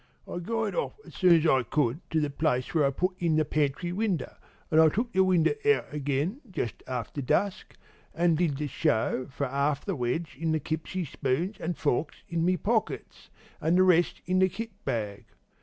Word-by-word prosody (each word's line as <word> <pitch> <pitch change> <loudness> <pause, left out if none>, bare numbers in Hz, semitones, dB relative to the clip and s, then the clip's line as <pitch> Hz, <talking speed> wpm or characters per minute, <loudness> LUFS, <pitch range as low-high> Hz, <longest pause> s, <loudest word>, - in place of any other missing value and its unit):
"I - - -4
guyed 225 +5 -2
off - - -2
as - - -13
soon 180 -2 +5
as 165 0 +2
I 135 -5 +4
could 125 +2 0
to 160 - +1
the 150 -2 -1
place 140 -4 0
where 155 -4 +3
I - - +4
put 180 +7 0
in 165 -2 +2
the 155 0 +3
pantry 150 +3 0
winder, 195 -2 -1 0.4
an' 155 - +5
I 160 0 +7
took 235 +9 -2
the 190 - +5
winder 185 - +3
out 435 - +2
again, 150 - -1
just 120 - -4
after 130 +2 -4
dusk, 195 +9 -1 0.4
an' 170 +1 +3
did 155 -3 +1
the 150 - -2
show 130 -3 0
for 140 +1 -3
'alf 140 +2 0
the - - -1
wedge 130 +6 -2
in 160 -1 0
the 155 - +1
kipsy 160 +5 -3
spoons 155 +8 -2
an' 175 +1 -2
forks 145 +1 -1
in 170 -1 -1
my 180 +2 +3
pockets, 220 +4 -2 0.3
an' 165 +2 +2
the 185 - +6
rest 175 -2 +3
in 185 +1 +1
the 190 0 +4
kit 225 +4 -6
bag. 105 -6 -3
160 Hz, 200 wpm, -28 LUFS, 140-185 Hz, 0.4 s, I